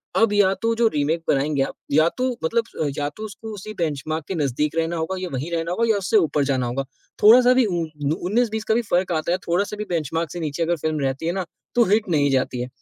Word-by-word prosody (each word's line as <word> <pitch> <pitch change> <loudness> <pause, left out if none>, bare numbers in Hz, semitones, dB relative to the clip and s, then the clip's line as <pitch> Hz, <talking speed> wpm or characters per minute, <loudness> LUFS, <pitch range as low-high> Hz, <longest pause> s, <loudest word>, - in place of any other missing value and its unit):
अब 225 -2 +3
या 200 -2 +4
तो 230 0 +1
जो 230 0 +3
रीमेक 155 0 0
बनाएँगे 140 0 +1
आप - - -4 0.2
या 155 +3 +5
तो 255 0 +1
मतलब 225 -5 -1
या 145 0 0
तो 215 - -7
उसको 215 +1 -8
उसी 210 +1 -7
बेंचमार्क 155 -1 -2
के 190 - -3
नज़दीक 150 +1 -1
रहना 165 +1 0
होगा 160 +4 -2
या 185 - -3
वहीं 140 +6 -3
रहना 170 0 -2
होगा 230 +5 0
या 215 - +3
उससे 195 +3 +2
ऊपर 155 -6 +2
जाना 130 -2 0
होगा। 130 +3 -2 0.4
थोड़ा-सा 245 +3 +8
भी 255 -1 +4
उ 195 - -2 0.4
19-20 220 +5 0
का - - +5
भी 240 - +2
फ़र्क 180 -4 0
आता 160 +1 -1
है। 180 - +2
थोड़ा-सा 200 +5 0
भी 210 - -3
बेंचमार्क 165 -1 -2
से 175 - -5
नीचे 155 0 -2
अगर 170 +1 +1
फ़िल्म 155 0 -2
रहती 135 +3 -2
है 170 - +1
ना 190 -2 -2 0.3
तो 240 - +6
हिट 215 0 +3
नहीं 145 -3 +2
जाती 130 -2 0
है 125 - -3
170 Hz, 245 wpm, -22 LUFS, 150-210 Hz, 0.4 s, थोड़ा-सा